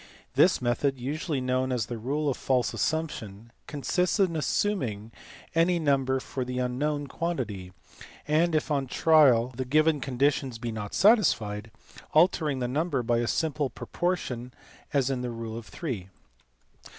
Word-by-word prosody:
This -, -, +4 dB
method, 130 Hz, +3 st, +1 dB
usually 145 Hz, +2 st, -2 dB
known 130 Hz, +1 st, 0 dB
as 125 Hz, -3 st, 0 dB
the 120 Hz, -2 st, -6 dB
ride 145 Hz, +5 st, -1 dB
of -, -, -3 dB
false 125 Hz, -3 st, 0 dB
assumption, 115 Hz, -9 st, -3 dB, 0.2 s
consists 180 Hz, +7 st, 0 dB
in 185 Hz, -4 st, +2 dB
assuming 130 Hz, -, -1 dB, 0.4 s
any 170 Hz, +2 st, +3 dB
number 135 Hz, -4 st, +1 dB
for 130 Hz, 0 st, -4 dB
the 125 Hz, 0 st, -5 dB
unknown 145 Hz, +4 st, -1 dB
quantity, 120 Hz, -, -4 dB, 0.6 s
and, 160 Hz, +2 st, +2 dB
if 155 Hz, 0 st, 0 dB
on 140 Hz, -2 st, 0 dB
trial 130 Hz, -5 st, +5 dB
the 130 Hz, -, -2 dB
given 155 Hz, +3 st, +2 dB
conditions 135 Hz, -1 st, 0 dB
be 120 Hz, 0 st, -4 dB
not 105 Hz, -2 st, -5 dB
satisfied, 115 Hz, -, +3 dB, 0.4 s
altering 155 Hz, -3 st, +3 dB
the 125 Hz, -1 st, -1 dB
number 140 Hz, 0 st, -1 dB
by 120 Hz, 0 st, +1 dB
a 120 Hz, -, -1 dB
simple 150 Hz, -1 st, 0 dB
proportion 130 Hz, -11 st, -3 dB, 0.4 s
as 135 Hz, -2 st, +1 dB
in 130 Hz, -2 st, -2 dB
rule 115 Hz, -2 st, -5 dB
of 115 Hz, -1 st, -8 dB
three. 115 Hz, -, -5 dB
135 Hz, 145 wpm, -27 LUFS, 120-155 Hz, 0.6 s, trial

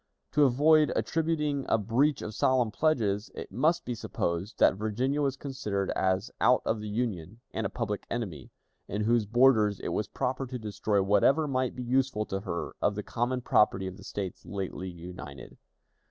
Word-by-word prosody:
To 150 Hz, -, +5 dB
avoid 150 Hz, +4 st, +4 dB
attributing 150 Hz, -3 st, 0 dB
a -, -, +4 dB
breach 125 Hz, +7 st, +1 dB
of 110 Hz, -, -5 dB
solemn 125 Hz, 0 st, +2 dB
pledges, 110 Hz, -8 st, +1 dB
it -, -, -7 dB
must 165 Hz, +6 st, +1 dB
be 125 Hz, -, -2 dB
supposed 95 Hz, -4 st, -3 dB
that -, -, +5 dB
Virginia 120 Hz, +8 st, -1 dB
was 135 Hz, -1 st, 0 dB
considered 105 Hz, -9 st, -3 dB
as 95 Hz, +4 st, 0 dB
out 125 Hz, -, +4 dB
of 110 Hz, -, 0 dB
the 105 Hz, -, -5 dB
Union, 105 Hz, -3 st, -3 dB
and 110 Hz, -, -2 dB
a -, -, -10 dB
public 110 Hz, -4 st, -4 dB
enemy, 95 Hz, -, -4 dB, 0.4 s
in 105 Hz, -, -3 dB
whose 115 Hz, -1 st, +2 dB
borders 110 Hz, -4 st, +4 dB
it -, -, -4 dB
was -, -, -1 dB
proper 130 Hz, +1 st, -2 dB
to 125 Hz, 0 st, -5 dB
destroy 105 Hz, -2 st, 0 dB
whatever 135 Hz, +10 st, +3 dB
might 130 Hz, -2 st, -1 dB
be 125 Hz, -, -5 dB
useful 125 Hz, -3 st, +1 dB
to 95 Hz, -, -3 dB
her 90 Hz, -4 st, -4 dB
of 105 Hz, -, +2 dB
the 105 Hz, -, -4 dB
common 125 Hz, +4 st, -1 dB
property 105 Hz, -4 st, +3 dB
of 95 Hz, 0 st, -6 dB
the 100 Hz, -, -13 dB
States 95 Hz, -3 st, -5 dB
lately 95 Hz, -2 st, -5 dB
united. 85 Hz, -6 st, -9 dB
115 Hz, 180 wpm, -29 LUFS, 100-130 Hz, 0.4 s, To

